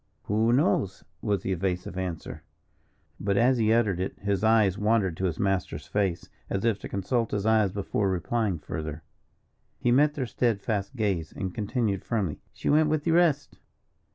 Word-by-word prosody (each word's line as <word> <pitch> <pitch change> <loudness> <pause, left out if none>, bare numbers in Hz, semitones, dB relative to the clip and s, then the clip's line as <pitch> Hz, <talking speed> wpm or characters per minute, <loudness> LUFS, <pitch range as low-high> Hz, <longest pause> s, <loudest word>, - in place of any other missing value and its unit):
"Who 110 +3 +2
knows?" 100 -6 +1 0.2
was 100 -4 0
the 95 - -2
evasive 90 -1 -2
answer; 90 -3 -5 0.8
but 100 0 0
as 125 +2 +4
he 110 -1 +3
uttered 110 -6 +2
it 95 - -3
his 100 -1 -1
eyes 110 -4 +4
wandered 105 -4 +1
to 95 - -1
his 85 -3 -1
master's 95 -2 -1
face, 95 -4 -1 0.2
as 95 +3 -1
if 110 -4 +2
to - - -7
consult 115 +4 -1
his 105 -1 -2
eyes 110 -3 +3
before 100 0 -1
replying 95 +2 0
further. 75 0 -6 0.7
He 120 - +1
met 145 +4 +4
their 135 - -1
steadfast 110 -2 -1
gaze, 95 -9 -1
and 95 -2 -4
continued, 105 -1 -1
firmly: 100 -10 -2
"She - - -6
went 155 +1 +4
with 155 -1 0
the 165 - +1
rest." 165 -4 +2
105 Hz, 170 wpm, -27 LUFS, 95-115 Hz, 0.8 s, as